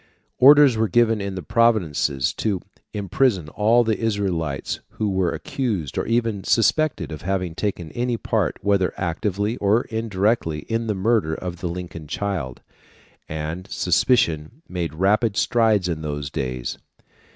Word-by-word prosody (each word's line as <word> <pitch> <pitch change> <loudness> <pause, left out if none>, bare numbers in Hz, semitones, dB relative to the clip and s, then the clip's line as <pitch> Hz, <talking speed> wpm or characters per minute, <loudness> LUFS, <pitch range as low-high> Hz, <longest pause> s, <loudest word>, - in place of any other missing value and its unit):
Orders 140 -2 +7
were 110 0 +2
given 115 +2 +3
in 100 -1 -4
the 95 - -5
provinces 80 - +1
to 100 -5 -1 0.3
imprison 100 - 0
all 115 +7 +3
the 110 -2 0
Israelites 95 - -2
who 105 -2 -1
were 95 -3 +1
accused 120 - -3
or - - -2
even 115 -4 0
suspected 115 - +1
of 75 - -7
having 90 -2 -2
taken 90 -4 -3
any 120 0 -1
part, - - -1
whether 100 -2 +1
actively 100 +5 -1
or 105 +3 +2
indirectly, 105 -7 0
in 115 +4 -2
the 105 - 0
murder 95 -5 +1
of 90 0 -6
the 90 0 -4
Lincoln 85 -3 -7
child; 85 -8 -3 0.7
and 80 +4 -5
suspicion 90 - +1
made 85 -4 -4
rapid 105 +4 +2
strides 110 -5 +2
in 80 -3 -3
those 75 -2 -4
days. 65 -2 -4
100 Hz, 140 wpm, -22 LUFS, 85-115 Hz, 0.7 s, Orders